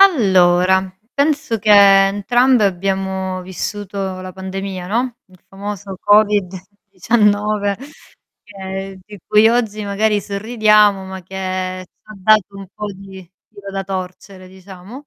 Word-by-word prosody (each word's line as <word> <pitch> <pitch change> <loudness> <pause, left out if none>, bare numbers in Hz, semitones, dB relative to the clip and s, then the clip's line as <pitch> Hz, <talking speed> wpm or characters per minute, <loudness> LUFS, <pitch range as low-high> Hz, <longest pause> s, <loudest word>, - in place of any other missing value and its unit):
Allora, 190 - +4 0.2
penso 285 -4 0
che 215 0 0
entrambe 205 +5 +5
abbiamo 190 0 -2
vissuto 190 +1 -5
la 185 0 -7
pandemia, 190 0 -6
no, 240 +4 -2
il 185 -2 -23
famoso 200 0 -7
Covid 205 -2 +3 0.4
19. 205 0 +1 0.7
che 195 -1 -7
di 205 0 -12
cui 215 +1 +5
oggi 220 -3 -1
magari 210 +1 0
sorridiamo, 210 -1 +2
ma 190 0 -8
che 185 0 -5
ci - - -58
ha 215 - -12
dato 200 0 +2
un 195 - -9
po' 210 -1 -5
di 190 -1 -12 0.2
filo 200 -1 -11
da 195 0 -4
torcere 185 0 -7
diciamo. 190 +8 -13
195 Hz, 125 wpm, -18 LUFS, 190-210 Hz, 0.7 s, entrambe